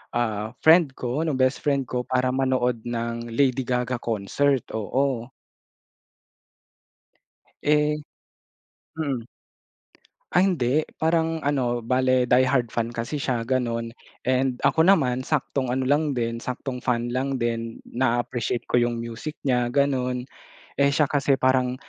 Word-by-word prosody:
ah, 110 -2 -1
friend 160 -3 +6
ko, 130 +6 -2
nung 145 -5 -1
bestfriend 135 0 +1
ko 125 -1 -2
para 130 0 0
manood 130 -3 0
ng 115 0 -4
Lady 130 +1 +2
Gaga 125 0 -1
concert. 120 +5 0
Oo. 125 +2 -1 2.3
Eh 150 0 +2 1.0
mm. 135 -6 -2 1.1
Ay, 180 +3 +3
hindi. 150 -5 +1 0.2
Parang 160 0 +1
ano, 130 -5 0
bale 130 +1 +2
die-hard 130 0 +3
fan 115 +1 -2
kasi 115 +6 -4
siya, 120 -4 -2
ganun. 115 -3 0 0.4
And 130 -1 +1
ako 145 +4 +3
naman, 130 -9 +3
saktong 135 -4 -1
ano 130 0 -1
lang 145 0 +2
din, 115 -2 -1
saktong 125 +1 -5
fan 120 -1 0
lang 130 +2 -2
din. 115 -1 -2
Naa-appreciate 120 -1 -1
ko - - +2
yung 120 -1 +1
music 115 +6 -6
niya, 125 -1 +1
ganun. 130 -2 0 0.5
Eh 140 0 +3
siya 150 -3 +2
kasi 140 -1 +2
parang, 130 -1 +2
130 Hz, 125 wpm, -24 LUFS, 120-140 Hz, 2.3 s, friend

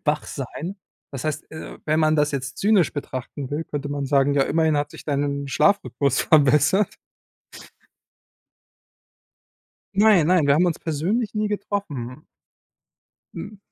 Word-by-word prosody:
wach 150 0 0
sein. 155 - -6 0.4
Das 135 0 -6
heißt, 155 0 -3
äh, 155 - -9
wenn 155 +1 +1
man 155 0 +3
das 150 0 +2
jetzt 135 -1 -4
zynisch 200 -5 +3
betrachten 135 -1 -6
will, 150 +3 -2
könnte 145 -1 -5
man 140 -1 -3
sagen: 140 0 +3
Ja, 140 - +4
immerhin 160 0 +1
hat 145 0 -1
sich - - -12
dein 140 -1 -2
Schlafrhythmus 150 -4 +1
verbessert. 155 +6 +3 3.0
Nein, 200 -6 +5
nein, 175 -5 +3
wir 140 - +5
haben 175 +4 +3
uns 170 - -1
persönlich 190 +10 -2
nie 210 0 0
getroffen. 155 - -4 1.1
Hm. 210 -1 -8
150 Hz, 135 wpm, -23 LUFS, 140-180 Hz, 3.0 s, Nein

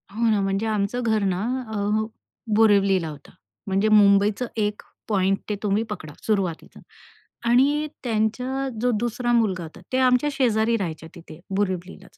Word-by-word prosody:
हो 230 0 +2
ना, 210 -2 +2
म्हणजे 195 +2 -1
आमचं 215 +3 -1
घर 220 -2 +1
ना 185 -2 0 0.3
अ, 210 +1 0 0.5
बोरिवलीला 200 -5 +4
होतं. 145 -2 -12 0.4
म्हणजे 195 +3 +1
मुंबईचा 205 +2 +4
एक 210 -1 -1 0.3
पॉइंट 195 -2 +2
ते 210 - 0
तुम्ही 210 +2 +1
पकडा 155 -8 -7
सुरुवातीचा 195 -6 -2 0.7
आणि 290 +5 +3 0.2
त्यांचा 250 +4 -1
जो 250 - +2
दुसरा 240 +1 -1
मुलगा 200 -7 +1
होता 160 - -11
ते - - +2
आमच्या 255 +3 +3
शेजारी 230 -4 +2
राहायच्या 160 -5 -5
तिथे 165 -2 -12 0.2
बोरिवलीलाच 190 -1 -3
210 Hz, 145 wpm, -24 LUFS, 195-230 Hz, 0.7 s, बोरिवलीला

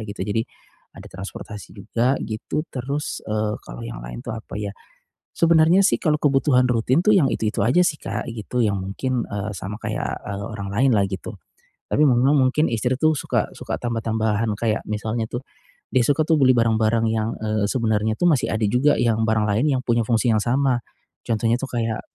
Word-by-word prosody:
gitu. 100 - -8
Jadi 110 +2 0 0.5
ada - - -11
transportasi 100 +2 -8
juga, 115 +6 0
gitu. 110 +7 -3
Terus, 140 +3 -4
eee, 105 0 -1
kalau - - -9
yang - - -7
lain - - -7
tuh - - -4
apa 110 - -9
ya? 100 -1 -4 0.6
Sebenernya 165 +3 +5
sih - - +3
kalau 150 -2 +2
kebutuhan 135 -2 +3
rutin 125 +6 +2
tuh 215 - +6
yang 155 - +4
itu-itu 105 -2 -1
aja 140 +10 +4
sih, 150 - 0
Kak, - - -4
gitu, 120 +2 -3
yang 100 -2 0
mungkin, 120 +6 -2
eee, 105 +1 -4
sama 100 +3 -6
kayak, - - -3
eee, 100 0 -5
orang 100 -2 -5
lain 130 +4 +3
lah, 100 - +3
gitu. 95 +3 -6 0.6
Tapi - - 0
memang 125 +4 +3
mungkin 135 +4 +3
istri 125 +3 0
tuh 155 +1 +3
suka - - -1
suka - - -4
tambah-tambahan 110 -2 -1
kayak 110 -1 0
misalnya 110 +2 -2
tuh, 120 - -3 0.5
dia 130 - +4
suka 145 +2 +3
tuh 160 -1 +3
beli 130 -1 +6
barang-barang 115 0 +2
yang, 110 0 0
eee, 110 -1 -1
sebenarnya 110 -3 0
itu - - 0
masih 145 -6 +2
ada 110 0 0
juga, 130 +7 +3
yang 115 -2 +2
barang 110 -1 +2
lain 110 +8 +2
yang - - -4
punya 120 -1 +2
fungsi 115 0 +2
yang 110 - +2
sama. 125 0 +1 0.5
Contohnya 115 +1 +1
itu 135 - -3
kayak, 115 -2 -1
115 Hz, 190 wpm, -22 LUFS, 110-130 Hz, 0.6 s, tuh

